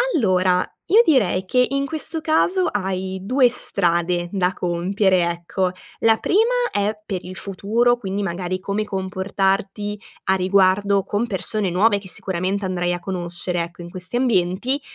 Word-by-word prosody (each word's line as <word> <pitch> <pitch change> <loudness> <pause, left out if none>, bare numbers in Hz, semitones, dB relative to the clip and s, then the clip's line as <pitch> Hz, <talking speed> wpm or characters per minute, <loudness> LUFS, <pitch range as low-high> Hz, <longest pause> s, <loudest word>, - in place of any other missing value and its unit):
Allora, 185 - +2 0.2
io 440 +5 +7
direi 205 - +2
che 250 +6 +3
in 275 0 -1
questo 315 +2 -1
caso 355 +4 +2
hai 190 -1 -3
2 250 +6 +3
strade 175 -5 0
da 185 -2 +1
compiere, 180 +1 +1
ecco: 175 +2 -2 0.3
la 225 -1 +4
prima 455 +6 +2 0.2
è 205 +1 -1
per 190 -3 -4
il 185 +1 -8
futuro, 220 +6 +1
quindi, 200 -3 -3
magari, 180 0 -3
come 200 +2 -2
comportarti 195 +1 -2 0.3
a 190 - +3
riguardo 195 +1 +3
con 215 +4 -2
persone 200 0 -1
nuove 200 +4 +3
che 195 - -13
sicuramente 190 +2 -2
andrai 175 -1 -1
a 175 - -3
conoscere, 175 -1 -2
ecco, 170 +1 -7
in 170 - -9
questi 185 +5 -5
ambienti; 240 +3 +1
190 Hz, 150 wpm, -21 LUFS, 180-215 Hz, 0.3 s, io